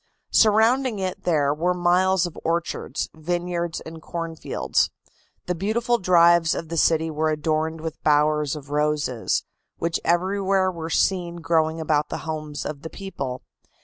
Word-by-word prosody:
Surrounding 225 +3 +4
it 185 -2 -4
there 145 -5 +2
were 175 +4 0
miles 180 +1 +3
of 175 - -6
orchards, 170 +1 -2
vineyards 175 +1 -2
and 160 0 -10
corn 165 0 -5
fields. - - 0 0.6
The 180 - -1
beautiful 225 +7 0
drives 170 -2 +5
of 165 - -5
the 165 - -3
city 160 0 +3
were 155 +1 0
adorned 155 +1 -1
with 160 -1 -6
bowers 150 0 +2
of 145 -1 -10
roses, 150 -5 0 0.3
which 165 0 -1
everywhere 190 +2 +1
were 165 -2 -6
seen 175 0 +1
growing 165 -1 +1
about 150 -1 +1
the - - -5
homes 155 -2 -4
of 150 -2 -5
the 160 - -7
people. 140 -9 -6
165 Hz, 150 wpm, -24 LUFS, 155-180 Hz, 0.6 s, drives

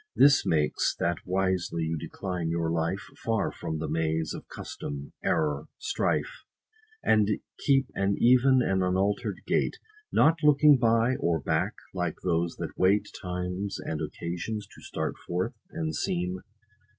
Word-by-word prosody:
This 140 0 +6
makes, 75 -2 +1
that 85 0 0
wisely 95 -3 0
you 80 +1 -1
decline 90 +1 -4
your 85 -1 0
life 85 +4 0
50 - - -21
Far 110 -3 0
from 80 - -4
the 80 - -3
maze 80 0 0
of - - -8
custom, 70 0 -7
error, 75 -2 0
strife, - - -1 0.6
And 105 -1 +4 0.3
keep 135 -1 +3
an 100 0 +1
even, 130 +1 +5
and 95 -3 +1
unalter'd 95 +2 0
gait; - - +1 0.3
Not 160 +2 +4
looking 150 -2 +6
by, 115 +1 +3
or 85 -1 +1
back, 70 - 0 0.2
like 90 -3 -1
those 85 -1 0
that - - -6
wait 95 +3 +3
Times 90 +2 -3
and 80 -1 -4
occasions, 85 +7 -4
to - - -15
start - - -3
forth, 90 +1 -1 0.2
and 80 -1 -3
seem. 90 +3 -1
90 Hz, 145 wpm, -28 LUFS, 80-110 Hz, 0.6 s, This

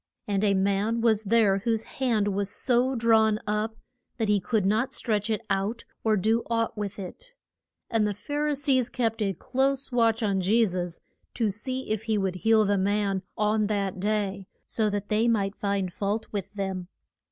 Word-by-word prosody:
And 200 -1 0
a 200 -2 +3
man 200 +4 +1
was 220 -2 +2
there 205 -2 +3
whose 225 +1 0
hand 225 -7 0
was 200 0 -1
so 250 +5 +2
drawn 220 -2 +3
up 215 +1 -1 0.4
that 225 -3 0
he 205 -1 +4
could 205 +1 0
not 220 +7 +1
stretch 215 -5 -1
it 220 0 0
out 200 +4 -1 0.2
or 220 -1 +3
do 220 +4 +2
aught 230 -1 0
with 205 -2 -4
it. 485 - -9 0.5
And 220 -2 +1
the 205 - -2
Phar 290 +8 -2
i 300 - +1
sees 270 -3 +2
kept 225 -3 -1
a 195 -2 +1
close 270 - -1
watch 230 -1 +2
on 195 -3 +1
Je 220 +5 +4
sus 175 -3 -3 0.3
to 225 -4 +1
see 255 +5 -4
if 215 0 -2
he 220 -2 +1
would 190 -2 -1
heal 220 +3 +4
the 200 -1 +2
man 200 0 +1 0.2
on 210 0 +2
that 200 -3 -1
day, 200 -1 -1 0.2
so 220 -2 0
that 205 0 -3
they 215 +2 +2
might 205 -3 +1
find 200 -3 -1
fault 205 +3 -2
with 200 -3 -3
them. 190 -3 -3
210 Hz, 185 wpm, -27 LUFS, 200-230 Hz, 0.5 s, he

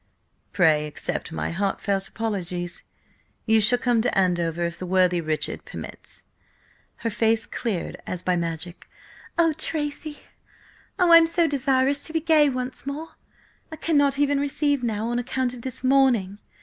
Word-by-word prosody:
"Pray, 155 -4 +3
accept 150 - -5
my - - -3
heartfelt 195 +1 -1
apologies! 180 -6 -4 0.6
You 220 -1 +4
shall 230 +4 +3
come 240 -2 +2
to 245 -2 -1
Andover 175 -3 +1
if 170 0 -5
the 185 - -5
worthy 180 -1 +3
Richard 155 -1 -2
permits." - - -10 0.8
Her 230 - +1
face 225 +1 +1
cleared 205 -8 -4
as 180 -1 -4
by 180 - +1
magic. 170 +1 -4 0.5
"Oh, 330 -2 +4
Tracy! 300 -1 -3 0.8
Oh, 360 -3 +4
I 335 - +11
am 330 0 +5
so 335 +1 +2
desirous 275 -1 +1
to 320 - -8
be 325 - +2
gay 310 -2 +4
once 255 +1 -4
more! 300 +4 -4 0.6
I - - -5
cannot 285 -4 +2
even 285 0 +2
receive 285 0 0
now, 225 -2 -2
on 240 0 0
account 250 0 -2
of 245 - -9
this 260 +1 -7
mourning! 255 -7 +3
240 Hz, 155 wpm, -24 LUFS, 185-285 Hz, 0.8 s, I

